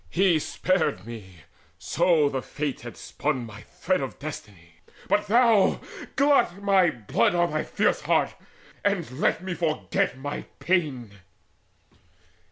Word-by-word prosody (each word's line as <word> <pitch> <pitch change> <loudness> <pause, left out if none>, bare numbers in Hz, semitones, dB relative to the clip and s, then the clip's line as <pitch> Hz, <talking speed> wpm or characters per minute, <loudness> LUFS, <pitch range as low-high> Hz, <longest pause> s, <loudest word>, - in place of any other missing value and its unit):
He 180 -3 +3
spared 160 - 0
me 95 -7 -10 0.4
so 155 - +2
the 135 -2 -2
Fates 145 0 -4
had 120 0 -9
spun 135 -5 -3
my 105 -1 -11
thread - - -2
Of - - -5
destiny. 85 -5 -9 0.3
But 210 0 +1
thou, 230 -2 +4 0.4
glut 280 -10 +3
with 200 - -14
my 195 -3 +4
blood 115 +1 0
Thy 175 -3 +1
fierce - - 0
heart, - - +1 0.5
and 200 -9 0
let 170 - +1
me 185 -1 -3
forget 160 -5 -1
my 145 +2 -5
pain." 130 - -1
155 Hz, 130 wpm, -26 LUFS, 115-185 Hz, 0.5 s, thou